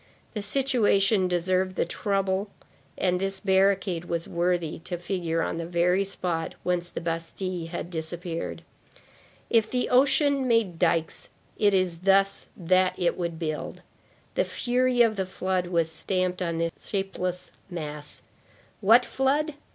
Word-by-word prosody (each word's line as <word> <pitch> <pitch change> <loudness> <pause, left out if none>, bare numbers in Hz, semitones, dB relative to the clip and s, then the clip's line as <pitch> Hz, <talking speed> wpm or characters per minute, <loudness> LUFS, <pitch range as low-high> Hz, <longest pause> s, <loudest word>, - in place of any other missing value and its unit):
The 215 - -3
situation 210 -6 +3
deserved 185 +1 0
the - - +1
trouble 195 +2 -1 0.5
and 180 -1 +1
this 195 0 -1
barricade 190 -3 +2
was 170 -1 -3
worthy 170 -2 -1
to 175 +1 -5
figure 170 -2 -1
on - - -2
the 165 - -3
very 180 +2 +2
spot 175 -4 -3
whence 175 -1 -1
the - - -6
Bastille 165 +1 -3
had 175 +1 -6
disappeared. 165 +1 -4 0.9
If 225 -2 +4
the 250 -1 0
ocean 275 +1 +3
made 225 -8 +2
dikes, 165 -2 +1 0.3
it 205 -2 +4
is 180 -3 0
thus 195 +1 +3
that 185 +1 +2
it 175 - +1
would 170 -2 -3
build. 155 -2 -4 0.5
The - - +2
fury 250 0 +2
of 220 -2 +1
the 190 -1 -1
flood 185 -1 -1
was 165 -2 +1
stamped 185 +2 -1
upon 170 -2 -1
this 165 0 0
shapeless 185 -2 -3 0.2
mass. 150 -4 -7 0.6
What 230 +4 +6
flood? 290 +4 +1
185 Hz, 140 wpm, -26 LUFS, 170-200 Hz, 0.9 s, What